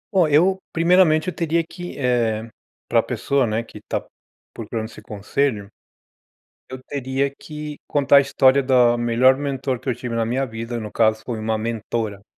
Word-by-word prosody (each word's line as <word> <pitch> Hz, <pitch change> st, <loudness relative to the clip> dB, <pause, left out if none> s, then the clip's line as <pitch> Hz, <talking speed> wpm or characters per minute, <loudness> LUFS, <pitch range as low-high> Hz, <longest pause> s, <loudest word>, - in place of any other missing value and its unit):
Ó, 175 Hz, -4 st, +5 dB
eu, 180 Hz, +6 st, +3 dB
primeiramente, 165 Hz, -1 st, +3 dB
eu -, -, -5 dB
teria 165 Hz, 0 st, 0 dB
que 175 Hz, -3 st, -8 dB
eh, 115 Hz, -4 st, 0 dB, 0.4 s
pra -, -, +3 dB
pessoa, 140 Hz, -3 st, 0 dB
né, 110 Hz, +2 st, -1 dB
que -, -, -12 dB
tá -, -, 0 dB, 0.5 s
procurando 110 Hz, 0 st, -5 dB
esse 110 Hz, -, -13 dB
conselho, 105 Hz, 0 st, -2 dB, 1.0 s
eu 130 Hz, 0 st, -8 dB
teria 135 Hz, 0 st, -1 dB
que 150 Hz, -1 st, -7 dB
contar 140 Hz, -1 st, +4 dB
a -, -, +8 dB
história 140 Hz, 0 st, +3 dB
da 125 Hz, -2 st, +4 dB
melhor 120 Hz, +3 st, +3 dB
mentor 135 Hz, -2 st, -2 dB
que 130 Hz, -, -14 dB
eu 130 Hz, -, +2 dB
tive 120 Hz, -2 st, -5 dB
na 115 Hz, -, 0 dB
minha 130 Hz, +4 st, -1 dB
vida. 115 Hz, +1 st, -5 dB
No 105 Hz, -2 st, -7 dB
caso, 110 Hz, -1 st, +2 dB
foi 120 Hz, -3 st, -4 dB
uma 110 Hz, 0 st, -1 dB
mentora 110 Hz, -2 st, -3 dB
130 Hz, 170 wpm, -21 LUFS, 115-145 Hz, 1.0 s, a